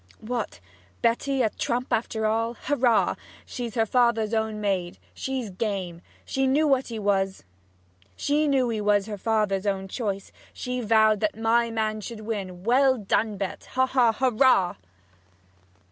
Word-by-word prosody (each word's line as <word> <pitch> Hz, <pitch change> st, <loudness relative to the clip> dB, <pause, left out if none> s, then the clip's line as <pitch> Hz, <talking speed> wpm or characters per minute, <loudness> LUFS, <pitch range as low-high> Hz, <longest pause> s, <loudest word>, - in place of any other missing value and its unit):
'What 230 Hz, -, -4 dB, 0.4 s
Betty 260 Hz, +3 st, +1 dB
a 220 Hz, -, +1 dB
trump 245 Hz, +2 st, -2 dB
after 220 Hz, -1 st, -1 dB
all? 225 Hz, +2 st, 0 dB
Hurrah! 245 Hz, -5 st, +1 dB, 0.3 s
She's 240 Hz, -4 st, -6 dB
her 225 Hz, -2 st, +2 dB
father's 230 Hz, -2 st, +2 dB
own 220 Hz, -1 st, -1 dB
maid! 190 Hz, -4 st, -1 dB, 0.2 s
She's 260 Hz, -6 st, -4 dB
game! 185 Hz, -4 st, -3 dB, 0.2 s
She 270 Hz, 0 st, 0 dB
knew 290 Hz, +2 st, +3 dB
he 235 Hz, -3 st, -7 dB
was 195 Hz, -2 st, 0 dB, 1.6 s
her 210 Hz, -1 st, -5 dB
father's 210 Hz, -2 st, 0 dB
own 195 Hz, -1 st, -1 dB
choice! 200 Hz, -2 st, -4 dB, 0.2 s
She 250 Hz, 0 st, -4 dB
vowed 220 Hz, -1 st, +4 dB
that 215 Hz, 0 st, -1 dB
my 230 Hz, +1 st, +2 dB
man 215 Hz, -1 st, -2 dB
should 220 Hz, +1 st, -7 dB
win! 195 Hz, -5 st, -5 dB
Well 260 Hz, +3 st, +4 dB
done, 210 Hz, 0 st, 0 dB
Bet! 195 Hz, -1 st, -5 dB
haw! 260 Hz, +1 st, +3 dB
haw! 250 Hz, -3 st, +3 dB
Hurrah!' 245 Hz, -, +3 dB
220 Hz, 130 wpm, -25 LUFS, 205-245 Hz, 1.6 s, vowed